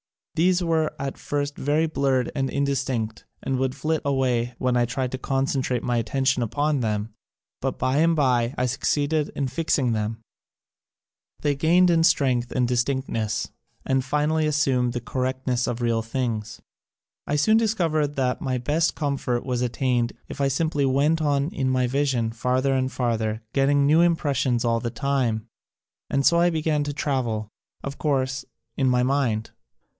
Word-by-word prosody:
1 165 - +2
hese 185 0 +2
were 160 -2 0
at 135 0 -5
first 145 0 -2
very 150 +3 +1
blurred 135 -5 0
and 135 -2 -1
indistinct, 135 -6 -2 0.2
and 135 -1 -1
would 130 0 -1
flit 155 +3 -1
away 125 -3 0
when 125 -1 0
1 120 -1 +2
tried 125 +1 -2
to 130 - -3
concentrate 135 -2 -1
my 120 -1 0
attention 130 +3 +1
upon 145 +6 0
them, 105 -2 -2 0.5
but 135 -1 -2
by 130 +2 0
and 165 +2 +4
by 125 -4 +2
I 125 - +1
succeeded 145 +4 0
in 140 - -1
fixing 130 -2 0
them; 110 0 -2 1.2
they 145 -1 +2
gained 175 +5 +4
in 165 -1 +3
strength 130 -7 +2
and 125 -1 +1
distinctness 120 -3 -1 0.3
and 135 0 +1
finally 150 +3 +1
assumed 135 -5 +1
the 120 - -3
concreteness 130 0 -1
of 120 0 -3
real 115 -1 +1
things. 115 -2 -3 0.7
I 145 - 0
soon 215 +10 +4
discovered 165 -10 +1
that 130 +2 0
my 130 -5 -1
best 150 +7 0
com 145 -3 -1
fort 120 -2 -2
was 125 -2 -1
attained 125 -1 0
if 140 - -6
I 140 - +3
simply 145 +1 0
went 145 +5 +2
on 145 -1 +1
in 135 -6 -1
my 130 -1 +2
vision 130 -3 0
farther 130 +4 0
and 130 0 0
farther, 115 -3 -1
getting 140 +1 +3
new 155 +4 +5
impressions 140 -7 +1
all 115 0 +2
the 120 0 -3
time, 120 -3 -1 0.6
and 140 0 +1
so 170 - +5
I 175 +1 +4
began 155 -2 0
to 145 - -3
travel 120 -7 -2 0.2
— - - -42
of 140 0 -6
course, 135 -3 0 0.3
in 135 -2 +2
my 125 0 +3
mind. 125 -5 0
135 Hz, 170 wpm, -24 LUFS, 125-145 Hz, 1.2 s, new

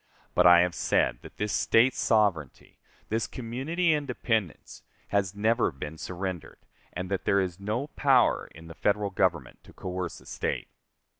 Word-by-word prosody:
But 90 0 +5
I 90 0 +8
have 90 0 +1
said - - +1
that - - -13
this 105 0 -2
State 125 +3 +4
sovereignty 100 - 0 0.3
this 110 +1 -1
community 140 +8 -1
independence 120 - -2 0.3
has 100 -1 0
never 110 +3 +2
been 75 +4 -8
surrendered, 90 -2 -5 0.3
and 90 +1 -5
that 95 - -2
there 100 - +3
is 90 -1 -2
no 110 +7 -2
power 140 -4 +2
in 80 +1 -12
the 80 - -10
Federal 100 +2 0
Government 85 -9 -1
to - - -17
coerce 90 -1 -5
a - - -19
State. - - -3
100 Hz, 155 wpm, -27 LUFS, 90-115 Hz, 0.3 s, I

